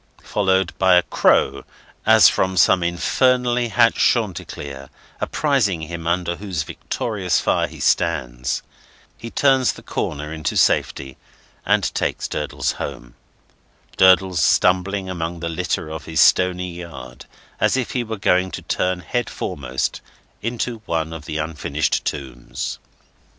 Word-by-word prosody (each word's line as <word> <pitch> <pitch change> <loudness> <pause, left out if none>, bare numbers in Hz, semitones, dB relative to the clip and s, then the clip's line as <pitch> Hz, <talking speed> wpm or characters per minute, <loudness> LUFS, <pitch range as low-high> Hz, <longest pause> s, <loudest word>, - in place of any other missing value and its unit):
followed 95 -1 +1
by 95 -1 +5
a 90 - +5
crow, 70 +1 +2 0.4
as 110 -1 +8
from 95 0 +1
some 90 +1 +5
infernally 120 +7 +1
hatched 110 - +3
Chanticleer, 70 -2 -1 0.3
apprising 125 - 0
him 85 +1 -6
under 85 0 0
whose 95 -7 -3
victorious 95 - -2
fire - - +1
he - - -12
stands, 65 -7 0 0.5
he 115 - -8
turns 135 0 +3
the - - -13
corner 75 +2 -4
into 80 -1 -2
safety, 65 -2 +1 0.5
and - - +2
takes - - -2
Durdles - - -2
home: - - -6 0.8
Durdles 95 -1 +5
stumbling 95 +1 +2
among 85 -2 -4
the 85 0 -3
litter 80 -1 -2
of 80 -1 -7
his 80 - -2
stony 90 0 +3
yard 85 -8 -10 0.3
as - - +2
if 125 - -2
he 125 - -1
were 110 -1 -5
going 90 -1 +2
to - - -6
turn 90 0 -1
head 120 +8 -2
foremost 65 -2 -3 0.4
into 115 0 -3
one 80 -1 -1
of 80 -2 -8
the 75 - -4
unfinished 75 -2 -1
tombs. 65 -5 -5
90 Hz, 135 wpm, -21 LUFS, 80-100 Hz, 0.8 s, as